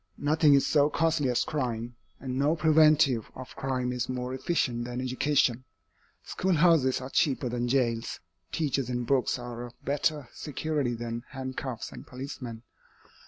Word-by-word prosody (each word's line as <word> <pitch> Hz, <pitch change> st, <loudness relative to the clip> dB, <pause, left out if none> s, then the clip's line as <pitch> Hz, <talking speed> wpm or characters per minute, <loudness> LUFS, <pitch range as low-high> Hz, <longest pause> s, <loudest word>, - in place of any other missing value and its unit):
Nothing 150 Hz, 0 st, +4 dB
is 140 Hz, -, +3 dB
so 145 Hz, -1 st, +3 dB
costly 160 Hz, -4 st, +1 dB
as 125 Hz, -, +2 dB
crime, 120 Hz, -5 st, -3 dB, 0.2 s
and 130 Hz, -2 st, -4 dB
no 150 Hz, +3 st, +3 dB
preventive 155 Hz, -6 st, +4 dB
of 130 Hz, 0 st, -9 dB
crime 130 Hz, -2 st, -1 dB
is 125 Hz, 0 st, -2 dB
more 125 Hz, 0 st, -3 dB
efficient 130 Hz, -4 st, 0 dB
than 125 Hz, 0 st, -4 dB
education. 130 Hz, -1 st, +1 dB, 0.6 s
Schoolhouses 165 Hz, -7 st, +3 dB
are 130 Hz, +1 st, -7 dB
cheaper 140 Hz, -6 st, +1 dB
than 120 Hz, 0 st, -1 dB
jails, 120 Hz, -3 st, 0 dB, 0.3 s
teachers 140 Hz, -5 st, -1 dB
and 125 Hz, -1 st, -2 dB
books 135 Hz, 0 st, +1 dB
are 120 Hz, 0 st, -6 dB
a -, -, -13 dB
better 145 Hz, 0 st, 0 dB
security 150 Hz, -4 st, -2 dB
than 115 Hz, 0 st, -5 dB
handcuffs 130 Hz, -3 st, -5 dB
and -, -, -11 dB
policemen. 125 Hz, -3 st, -7 dB
130 Hz, 145 wpm, -28 LUFS, 120-150 Hz, 0.6 s, Nothing